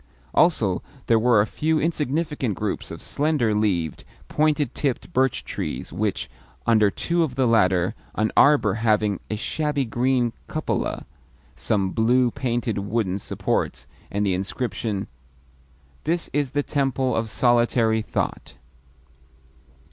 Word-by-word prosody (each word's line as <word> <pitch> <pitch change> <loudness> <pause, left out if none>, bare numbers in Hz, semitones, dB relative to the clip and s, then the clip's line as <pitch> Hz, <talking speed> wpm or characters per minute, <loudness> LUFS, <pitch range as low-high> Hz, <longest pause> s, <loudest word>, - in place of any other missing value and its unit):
Also, 110 - +3 0.2
there 115 -1 +4
were 115 -2 +4
a - - +2
few 155 +7 0
insignificant 150 - -1
groups 105 0 -3
of - - -9
slender 145 -7 +1
leaved, 90 -8 0 0.3
pointed 150 -3 +1
tipped 140 +4 -2
birch 130 -1 +1
trees, - - -5
with, 100 +2 -1 0.4
under 110 -3 +4
two 170 - -1
of 145 -6 -1
the 130 -1 +2
latter, 95 -4 +3 0.2
an 110 0 +1
arbour 140 -9 +5
having 105 -3 +2
a 110 - -1
shabby 145 +5 -1
green 120 0 +1
cupola, - - -2 0.5
some 100 -3 0
blue 120 +3 +3
painted 120 -3 -1
wooden 100 -2 -1
supports, 65 -7 -2 0.2
and 100 +1 -1
the 95 - +2
inscription 100 +1 -2 1.0
"This 170 +2 -1
is 145 -2 +1
the 145 - +3
Temple 135 -4 0
of 115 0 -1
Solitary 120 -1 +2
Thought." 70 - -3
115 Hz, 125 wpm, -24 LUFS, 105-135 Hz, 1.0 s, arbour